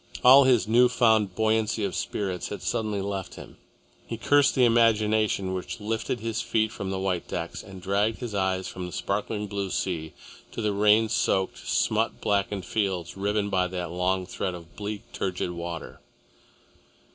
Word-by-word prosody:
All 135 +2 +9
his 125 -5 +3
new 120 +3 +5
found 110 -6 +3
buoyancy 110 0 +1
of 95 - -3
spirits 95 -3 -3
had - - -7
suddenly 105 -3 -1
left 95 -2 -4
him. - - -12 0.5
He 115 - -4
cursed 145 +4 +3
the 125 - +5
imagination 110 -4 +2
which 95 +5 -5
lifted 110 +2 -2
his 115 0 -2
feet 110 -1 0
from 95 - -5
the 95 - -2
white 95 -2 -2
decks - - -4
and 95 -1 -11
dragged 100 +4 +1
his 120 -4 -6
eyes 95 -1 0
from 90 -1 -6
the - - -8
sparkling 105 +3 -2
blue 100 -1 -3
sea 80 -4 -3 0.4
to - - -6
the 105 -1 +1
rain 105 +2 +4
soaked, 95 -3 0
smut - - +1
blackened 100 -2 0
fields 95 -5 -2
riven 100 +1 -1
by 90 -1 +2
that 90 -2 -4
long 90 +1 0
thread 90 0 -3
of 85 -1 -13
bleak, 105 0 -5
turgid 90 -1 -2
water. 85 -1 -6
100 Hz, 170 wpm, -26 LUFS, 95-110 Hz, 0.5 s, All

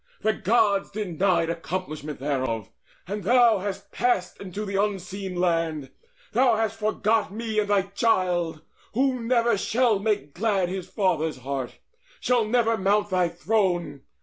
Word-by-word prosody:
The 220 +1 +2
Gods 205 -1 +2
denied 185 -4 0
Accomplishment 160 -3 -5
thereof. 130 -7 -2 0.4
And 205 +2 -4
thou 235 0 +5
hast 195 0 -5
passed 195 -8 0
Unto 200 +2 -5
the 200 -1 -4
Unseen 195 -1 -2
Land: 165 -5 0 0.4
thou 250 -2 +4
hast 220 0 -1
forgot 215 -1 +1
Me 220 0 -2
and 205 -1 -1
thy 200 -2 +3
child, 180 -6 0 0.3
who 260 0 +2
never 235 -2 +2
shall 230 -2 +2
make 200 -8 -1
glad 195 -3 +1
His 185 -1 -5
father's 175 -6 0
heart, 130 -1 -5 0.4
shall 245 -3 +2
never 230 0 +2
mount 205 +2 +1
thy 180 -2 +2
throne. 175 -5 0
195 Hz, 140 wpm, -25 LUFS, 175-220 Hz, 0.4 s, thou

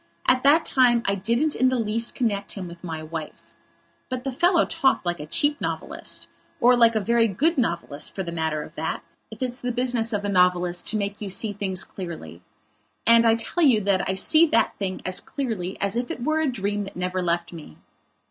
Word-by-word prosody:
At 255 0 +4
that 300 +4 +4
time 240 -3 +3
I 200 - +1
didn't 235 +10 0
in 255 - +3
the 260 - 0
least 230 +1 -2
connect 205 -5 -1
him 190 -3 -6
with 170 0 -12
my 160 -3 -5
wife. 155 -1 -8 0.6
But 255 -1 -4
the 270 - -3
fellow 345 +6 +3
talked 290 - +1
like 175 0 -2
a 150 - -7
cheap 290 - +1
novelist. - - -4 0.3
Or 245 +1 +5
like 230 -1 +4
a - - +3
very 230 +2 +2
good 300 - +1
novelist 170 - -2
for 190 - -3
the 170 - -6
matter 160 -2 -2
of - - -13
that, - - -4 0.3
if - - -7
it's 250 0 -4
the 245 - -2
business 245 -2 0
of 205 -2 -2
a - - 0
novelist 180 -2 +2
to 220 - +2
make 205 0 -4
you 205 - -4
see 205 +2 -2
things 190 -2 0
clearly. 160 - -8 0.6
And 230 0 +6
I 225 - +5
tell 230 +10 -2
you 235 -8 +4
I 190 -1 +1
see 315 - +5
that 230 -6 +2
thing 190 -2 -4
as 185 0 -1
clearly 215 -9 -4
as 200 +1 -1
if 245 +1 -2
it 240 - -5
were 310 +3 +1
a 315 - +1
dream 205 -2 -2
that 195 - -11
never 180 +1 -2
left 170 0 -1
me. 150 - -11
210 Hz, 215 wpm, -24 LUFS, 180-250 Hz, 0.6 s, And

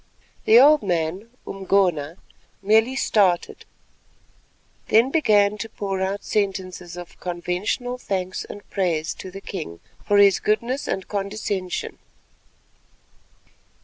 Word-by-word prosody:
The 225 +2 +7
old 295 +3 +7
man, 180 +3 -2 0.2
Umgona, 185 -5 0 0.5
merely 220 +5 +3
started, 195 -9 +1 1.2
then 230 +5 +4
began 210 -8 +3
to 225 0 -5
pour 195 -3 -4
out 195 +2 -2
sentences 185 -3 -3
of 175 -1 -10
conventional 180 +8 -3
thanks 185 -4 -3
and 205 - -11
praise 170 -5 -1
to 185 - -9
the 195 +2 -9
king 155 - -7 0.2
for 205 - +2
his 200 -1 +6
goodness 235 +6 -1
and 190 - -3
condescension. 200 -2 -3
195 Hz, 110 wpm, -23 LUFS, 180-215 Hz, 1.2 s, The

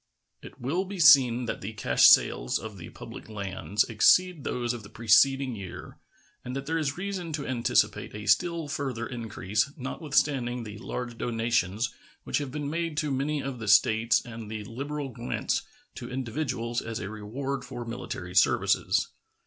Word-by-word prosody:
It - - -12
will 155 +10 -1
be 195 0 -7
seen 130 -5 +7
that - - -4
the 105 +3 -5
cash 65 -12 +5
sales - - +4
of 105 -3 -8
the 85 - -9
public - - -10
lands 100 0 -1
exceed 165 - +3
those 120 -1 -1
of 120 - -6
the 100 - -12
preceding 130 +4 +3
year, 95 -4 -9 0.4
and 125 - -5
that 135 0 -4
there 165 +2 -1
is 145 -1 -2
reason 185 -3 -4
to 145 -2 -3
anticipate 120 -4 0
a 105 0 -7
still 170 0 +2
further 135 -6 -3
increase, 110 -2 -2
notwithstanding 135 -3 0
the 105 -1 -8
large 120 0 -5
donations 115 -2 0 0.3
which - - -1
have 140 -3 -5
been 145 0 -4
made 165 0 -2
to 150 -2 0
many 140 +2 -1
of 135 -3 -5
the 110 - -6
States 110 +2 +4
and 115 -2 -8
the 110 -1 -5
liberal 140 +6 -5
grants 120 0 -2 0.3
to - - -8
individuals 125 -2 -2
as 115 -1 -5
a 95 - -5
reward 120 +7 -4
for 125 -2 -7
military 90 -6 -6
services. - - +3
120 Hz, 165 wpm, -28 LUFS, 110-140 Hz, 0.4 s, seen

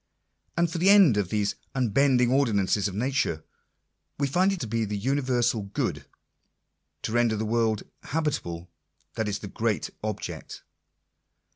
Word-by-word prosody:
And 170 0 +3
for 165 +1 -4
the 185 +3 +4
end 195 - +7
of 100 -3 0
these 105 0 0 0.2
unbending 125 0 +3
ordinances 105 -7 +2
of 95 - -6
nature 125 - 0 0.4
— - - -52
we 140 - +2
find 180 +8 +2
it 195 - -3
to 120 - -3
be 115 +1 0
the 105 -1 -3
universal 125 -1 +1
good. 100 0 -3 1.0
To - - -2
render 120 -1 +2
the 110 +1 -2
world 110 -1 +1 0.2
habitable; 90 - -3 0.4
that 110 - -2
is 100 -1 -1
the 105 - -8
great 110 +2 -1
object. 110 -2 -5
115 Hz, 150 wpm, -26 LUFS, 105-140 Hz, 1.0 s, end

